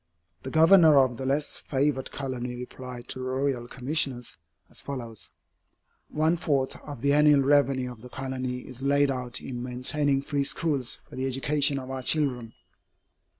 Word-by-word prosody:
The 130 Hz, -, -6 dB
Governor 160 Hz, 0 st, +6 dB
of 130 Hz, -3 st, +3 dB
the 130 Hz, -, -4 dB
less 145 Hz, +2 st, 0 dB
favored 135 Hz, -1 st, -1 dB
colony 125 Hz, -3 st, -4 dB
replied 125 Hz, 0 st, -8 dB
to -, -, -5 dB
the 130 Hz, -, -4 dB
Royal 130 Hz, -2 st, -1 dB
Commissioners, 130 Hz, -1 st, -2 dB, 0.3 s
as -, -, 0 dB
follows: 120 Hz, -6 st, -5 dB, 0.8 s
"One 160 Hz, +3 st, +1 dB
fourth 140 Hz, -6 st, 0 dB
of 145 Hz, -6 st, -9 dB
the 140 Hz, +1 st, +3 dB
annual 150 Hz, -1 st, +5 dB
revenue 135 Hz, -2 st, +2 dB
of 115 Hz, -3 st, -12 dB
the 125 Hz, -, -10 dB
Colony 130 Hz, -1 st, -4 dB
is 130 Hz, 0 st, -10 dB
laid 140 Hz, 0 st, +3 dB
out 125 Hz, -2 st, -4 dB
in 120 Hz, -2 st, -6 dB
maintaining 135 Hz, +3 st, 0 dB
free 140 Hz, 0 st, -1 dB
schools 140 Hz, -2 st, -1 dB
for -, -, -12 dB
the 130 Hz, +1 st, -2 dB
education 140 Hz, +2 st, +1 dB
of 130 Hz, -1 st, -6 dB
our 130 Hz, -1 st, -4 dB
children." 125 Hz, -5 st, 0 dB
135 Hz, 160 wpm, -27 LUFS, 125-145 Hz, 0.8 s, Governor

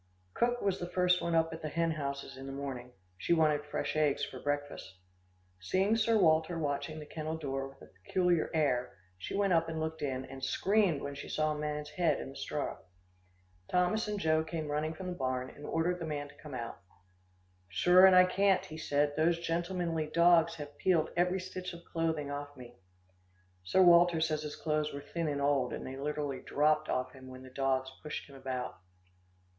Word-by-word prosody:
Cook 245 Hz, 0 st, 0 dB
was 195 Hz, -1 st, +1 dB
the 175 Hz, -, -4 dB
first 180 Hz, 0 st, +3 dB
one 170 Hz, -1 st, 0 dB
up 165 Hz, 0 st, +2 dB
at 160 Hz, -, -7 dB
the 155 Hz, -, -3 dB
hen 165 Hz, +1 st, 0 dB
houses 140 Hz, -3 st, -4 dB
in 135 Hz, +1 st, -9 dB
the -, -, -5 dB
morning. 135 Hz, -3 st, -5 dB, 0.3 s
She 170 Hz, -, +1 dB
wanted 155 Hz, -2 st, +3 dB
fresh 150 Hz, -, -3 dB
eggs 150 Hz, -2 st, +2 dB
for 130 Hz, -, -9 dB
breakfast. 145 Hz, -9 st, -3 dB, 0.6 s
Seeing 190 Hz, -, +1 dB
Sir 225 Hz, 0 st, +3 dB
Walter 160 Hz, -2 st, +3 dB
watching 145 Hz, 0 st, -2 dB
the 150 Hz, -, -8 dB
kennel 155 Hz, +1 st, -4 dB
door 135 Hz, -3 st, -3 dB
with 135 Hz, -, -15 dB
a -, -, -16 dB
peculiar 180 Hz, -, +2 dB
air, 125 Hz, -9 st, 0 dB, 0.2 s
she 90 Hz, -, -5 dB
went 200 Hz, -2 st, +2 dB
up 165 Hz, 0 st, +2 dB
and 160 Hz, -1 st, -3 dB
looked 160 Hz, 0 st, -3 dB
in, 130 Hz, -2 st, -2 dB
and 135 Hz, 0 st, -10 dB
screamed 190 Hz, +1 st, +2 dB
when 140 Hz, -, -4 dB
she 140 Hz, -, -8 dB
saw 155 Hz, 0 st, +1 dB
a 150 Hz, -, -3 dB
man's 150 Hz, 0 st, -3 dB
head 165 Hz, +1 st, +1 dB
in -, -, -6 dB
the -, -, -14 dB
straw. -, -, -3 dB, 0.9 s
Thomas 180 Hz, +5 st, +1 dB
and 210 Hz, -1 st, -2 dB
Joe 160 Hz, -2 st, +2 dB
came 160 Hz, -2 st, -4 dB
running 155 Hz, +2 st, -1 dB
from 185 Hz, -, -7 dB
the 180 Hz, -, -3 dB
barn, 130 Hz, -4 st, -2 dB
and 145 Hz, -, -10 dB
ordered 175 Hz, +2 st, 0 dB
the 165 Hz, -, -4 dB
man 145 Hz, -2 st, -4 dB
to -, -, -16 dB
come 150 Hz, -4 st, -8 dB
out. 115 Hz, -2 st, -5 dB, 0.9 s
"Sure 180 Hz, -, +6 dB
and 190 Hz, -, +6 dB
I 185 Hz, 0 st, +8 dB
can't," 195 Hz, +1 st, +2 dB
he 155 Hz, 0 st, -8 dB
said, 145 Hz, -1 st, +1 dB
"those 165 Hz, +2 st, +3 dB
gentlemanly 170 Hz, -1 st, -1 dB
dogs 170 Hz, +1 st, +4 dB
have 145 Hz, -2 st, -9 dB
peeled 170 Hz, -4 st, +2 dB
every 180 Hz, +2 st, +2 dB
stitch 185 Hz, 0 st, -6 dB
of 170 Hz, 0 st, -11 dB
clothing 160 Hz, -3 st, -1 dB
off 145 Hz, 0 st, -6 dB
me." 120 Hz, -1 st, -12 dB, 0.8 s
Sir 185 Hz, -, +4 dB
Walter 175 Hz, -1 st, +6 dB
says 155 Hz, -1 st, 0 dB
his 150 Hz, -1 st, -5 dB
clothes 155 Hz, -1 st, -1 dB
were 140 Hz, -, -6 dB
thin 170 Hz, -2 st, -1 dB
and 145 Hz, -1 st, -1 dB
old, 140 Hz, -3 st, +2 dB
and -, -, -5 dB
they 130 Hz, -, -6 dB
literally 145 Hz, -1 st, -3 dB
dropped 150 Hz, +1 st, +1 dB
off 130 Hz, 0 st, -1 dB
him, 130 Hz, -1 st, -12 dB
when 130 Hz, 0 st, -10 dB
the 130 Hz, -, -12 dB
dogs 130 Hz, 0 st, 0 dB
pushed 150 Hz, -, -5 dB
him 140 Hz, -, -14 dB
about. 130 Hz, -5 st, -5 dB
155 Hz, 205 wpm, -32 LUFS, 140-170 Hz, 0.9 s, I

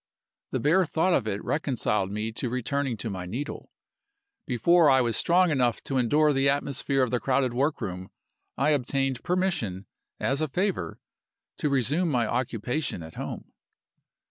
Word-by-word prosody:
The -, -, -2 dB
bare 165 Hz, +6 st, +4 dB
thought 175 Hz, +5 st, +1 dB
of 110 Hz, -, +1 dB
it 100 Hz, -1 st, -3 dB
reconciled 120 Hz, -9 st, 0 dB
me 105 Hz, +2 st, -3 dB
to 120 Hz, +2 st, -3 dB
returning 130 Hz, +1 st, -2 dB
to 110 Hz, -, -4 dB
my 90 Hz, -2 st, -5 dB
needle. 130 Hz, +10 st, -5 dB, 0.8 s
Before 155 Hz, +6 st, +4 dB
I 130 Hz, -1 st, +5 dB
was 120 Hz, -3 st, +1 dB
strong 175 Hz, +4 st, +3 dB
enough 125 Hz, -5 st, +1 dB
to 135 Hz, -2 st, -1 dB
endure 150 Hz, +5 st, +3 dB
the 135 Hz, 0 st, +3 dB
atmosphere 140 Hz, -1 st, 0 dB
of 125 Hz, -, -1 dB
the 125 Hz, -, +1 dB
crowded 130 Hz, -1 st, +1 dB
workroom 110 Hz, -, -2 dB, 0.5 s
I 140 Hz, +3 st, +2 dB
obtained 135 Hz, -2 st, 0 dB
permission, 175 Hz, -, -1 dB, 0.3 s
as 140 Hz, +3 st, 0 dB
a 155 Hz, -, +1 dB
favor, 175 Hz, -, -2 dB, 0.6 s
to 150 Hz, -, 0 dB
resume 140 Hz, +6 st, +1 dB
my 125 Hz, -5 st, +1 dB
occupation 125 Hz, -, -2 dB
at 80 Hz, -, -10 dB
home. -, -, -7 dB
135 Hz, 155 wpm, -27 LUFS, 115-150 Hz, 0.8 s, I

